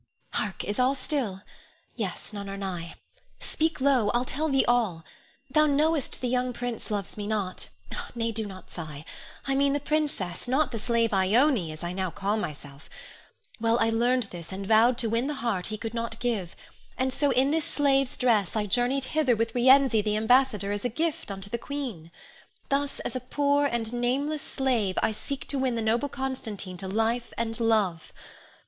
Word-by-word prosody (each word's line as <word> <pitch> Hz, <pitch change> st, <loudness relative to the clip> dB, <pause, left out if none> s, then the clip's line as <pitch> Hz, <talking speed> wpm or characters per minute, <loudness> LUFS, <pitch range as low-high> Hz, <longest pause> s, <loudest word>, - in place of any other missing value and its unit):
Hark! 205 Hz, -2 st, -2 dB
is 205 Hz, +4 st, -3 dB
all 255 Hz, +2 st, +3 dB
still? 255 Hz, -8 st, -2 dB, 0.5 s
Yes; -, -, -4 dB
none 200 Hz, -1 st, -5 dB
are 195 Hz, -, -5 dB
nigh! 180 Hz, -4 st, -5 dB, 0.4 s
Speak 320 Hz, +1 st, -1 dB
low. 260 Hz, -6 st, +3 dB
I'll 245 Hz, +1 st, +2 dB
tell 310 Hz, +5 st, -1 dB
thee 270 Hz, -1 st, +3 dB
all. 220 Hz, -9 st, +1 dB, 0.5 s
Thou 305 Hz, -1 st, +5 dB
knowest 300 Hz, 0 st, +1 dB
the 250 Hz, -, 0 dB
young 250 Hz, 0 st, 0 dB
prince 240 Hz, -1 st, -4 dB
loves 205 Hz, -2 st, -3 dB
me 205 Hz, -1 st, -4 dB
not, 205 Hz, -4 st, -2 dB, 0.5 s
nay, 230 Hz, -1 st, 0 dB
do 220 Hz, -1 st, -2 dB
not 190 Hz, -2 st, -11 dB
sigh; 155 Hz, -3 st, -7 dB, 0.4 s
I 275 Hz, -, 0 dB
mean 275 Hz, +1 st, +3 dB
the 290 Hz, -, +1 dB
princess, 285 Hz, -, -1 dB
not 265 Hz, +2 st, +2 dB
the 230 Hz, -, -3 dB
slave 230 Hz, -1 st, +1 dB
Ione, 200 Hz, -, +3 dB
as 155 Hz, +2 st, -9 dB
I 175 Hz, +1 st, -3 dB
now 185 Hz, 0 st, -1 dB
call 200 Hz, +4 st, -1 dB
myself. 145 Hz, -7 st, -6 dB, 0.7 s
Well, 230 Hz, +1 st, +3 dB
I 225 Hz, -1 st, +2 dB
learned 245 Hz, +2 st, +2 dB
this, 170 Hz, -1 st, -8 dB
and 195 Hz, +1 st, -5 dB
vowed 225 Hz, +4 st, +5 dB
to 240 Hz, -, +1 dB
win 235 Hz, +3 st, +1 dB
the 300 Hz, -, -2 dB
heart 230 Hz, -8 st, -1 dB
he 215 Hz, -, -4 dB
could 225 Hz, +1 st, -5 dB
not 230 Hz, -1 st, -3 dB
give; 215 Hz, -8 st, -2 dB, 0.4 s
and 260 Hz, 0 st, 0 dB
so 290 Hz, +1 st, +2 dB
in 270 Hz, +1 st, +3 dB
this 320 Hz, 0 st, +1 dB
slave's 275 Hz, -2 st, +2 dB
dress 225 Hz, -7 st, +2 dB
I 215 Hz, -1 st, +1 dB
journeyed 245 Hz, +5 st, +1 dB
hither 300 Hz, -6 st, +3 dB
with 225 Hz, +1 st, -1 dB
Rienzi, 255 Hz, -2 st, +5 dB
the 210 Hz, 0 st, 0 dB
ambassador, 220 Hz, -3 st, +3 dB
as 205 Hz, 0 st, -2 dB
a 245 Hz, -, +1 dB
gift 320 Hz, +4 st, -2 dB
unto 195 Hz, 0 st, -4 dB
the 235 Hz, -, -1 dB
queen. 245 Hz, -, -5 dB, 0.6 s
Thus, 280 Hz, 0 st, 0 dB
as -, -, -4 dB
a -, -, 0 dB
poor 285 Hz, +3 st, +2 dB
and 235 Hz, -3 st, -2 dB
nameless 275 Hz, +5 st, 0 dB
slave, 240 Hz, -11 st, 0 dB
I -, -, +3 dB
seek 275 Hz, +5 st, -5 dB
to 275 Hz, -, -1 dB
win 260 Hz, -2 st, +1 dB
the 230 Hz, -, -1 dB
noble 235 Hz, +6 st, +1 dB
Constantine 225 Hz, -9 st, -4 dB
to 190 Hz, -, -5 dB
life 225 Hz, +4 st, 0 dB
and 230 Hz, 0 st, -2 dB
love. 210 Hz, -8 st, +1 dB
235 Hz, 190 wpm, -27 LUFS, 205-270 Hz, 0.7 s, Thou